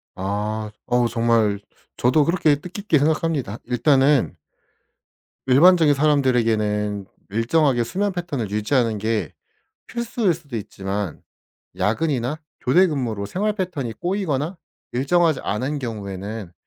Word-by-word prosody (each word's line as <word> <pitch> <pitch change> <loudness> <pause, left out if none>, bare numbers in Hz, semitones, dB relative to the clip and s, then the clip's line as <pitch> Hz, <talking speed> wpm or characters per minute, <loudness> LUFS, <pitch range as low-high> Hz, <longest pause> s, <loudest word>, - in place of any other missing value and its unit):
아. 105 +3 -3 0.2
어우 120 -1 +2
정말 115 -3 +2 0.4
저도 130 +5 +3
그렇게 165 -3 +3
뜻깊게 180 +2 -1
생각합니다. 150 -7 0
일단은 135 -1 +3 1.1
일반적인 160 +3 +6
사람들에게는 115 -8 +1 0.2
일정하게 120 +4 +2
수면 195 - -1
패턴을 145 - -3
유지하는 110 +1 +1
게 110 +1 -1 0.6
필수일 230 -5 0
수도 150 -6 -11
있지만 100 -3 -4 0.6
야근이나 125 - 0 0.2
교대 180 +9 +4
근무로 120 - -2
생활 205 - -1
패턴이 165 - -3
꼬이거나 175 -3 -2 0.3
일정하지 155 +5 +2
않은 130 +8 -2
경우에는 105 -4 -6
130 Hz, 290 characters per minute, -22 LUFS, 110-160 Hz, 1.1 s, 일반적인